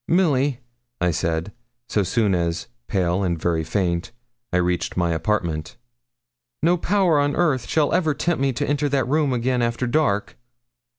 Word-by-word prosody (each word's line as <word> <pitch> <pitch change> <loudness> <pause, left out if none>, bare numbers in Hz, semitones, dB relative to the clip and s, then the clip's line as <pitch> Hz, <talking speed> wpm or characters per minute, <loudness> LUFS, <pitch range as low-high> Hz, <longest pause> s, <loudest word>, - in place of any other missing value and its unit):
'Milly,' 145 -7 +2 0.4
I 90 0 +2
said, 80 +4 -1 0.4
so 105 - +1
soon 100 +2 +1
as, 85 -1 -1 0.2
pale 90 -1 0
and 85 -4 -1
very 80 -1 0
faint, 85 +2 -1 0.4
I 90 - +2
reached 90 0 -1
my 85 -1 +1
apartment, 85 -3 -2 0.9
'no 170 +2 +4
power 180 -3 +2
on 145 0 +1
earth 145 -9 +1
shall 150 -3 +1
ever 160 -4 +2
tempt 170 -3 -1
me 135 0 +2
to - - -2
enter 145 0 0
that 135 -2 +1
room 150 0 +2
again 125 0 0
after 120 +1 0
dark.' 120 -6 0
120 Hz, 160 wpm, -23 LUFS, 90-145 Hz, 0.9 s, no